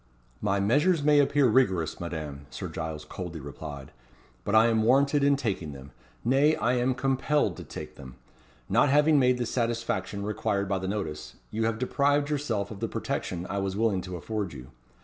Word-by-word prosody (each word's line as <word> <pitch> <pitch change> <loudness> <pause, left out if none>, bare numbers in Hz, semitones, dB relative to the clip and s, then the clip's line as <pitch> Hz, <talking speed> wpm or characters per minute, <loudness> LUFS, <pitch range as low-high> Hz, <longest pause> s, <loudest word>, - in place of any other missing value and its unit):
"My 100 -1 +1
measures 145 - +3
may 150 0 +5
appear 145 0 +3
rigorous, 95 -9 +2
Madame," 75 -5 -6
Sir - - -6
Giles 80 -1 -5
coldly 85 0 -6
replied; 70 -1 -8 0.5
"but 105 - 0
I 110 +1 +7
am 115 -1 +3
warranted 140 +5 +3
in 140 0 +5
taking 100 - -3
them. 70 0 -11 0.3
Nay, 140 +5 +4
I 120 +2 +1
am 125 +1 +1
compelled 135 - +1
to - - -7
take - - -9
them. 65 -2 -11 0.5
Not 145 - +3
having 150 +1 +5
made 125 -1 +3
the 120 - -1
satisfaction 115 -5 -2
required 105 -1 -1
by 95 0 0
the 95 - -4
notice, 95 -7 -4 0.2
you 110 +1 -1
have 115 0 0
deprived 145 +4 +1
yourself 115 -9 -1
of 105 - -8
the - - -1
protection 90 -1 -3
I 100 - -2
was 95 0 -2
willing 105 -4 +1
to 90 0 -6
afford 105 0 -4
you. 65 0 -10
110 Hz, 185 wpm, -27 LUFS, 90-135 Hz, 0.5 s, I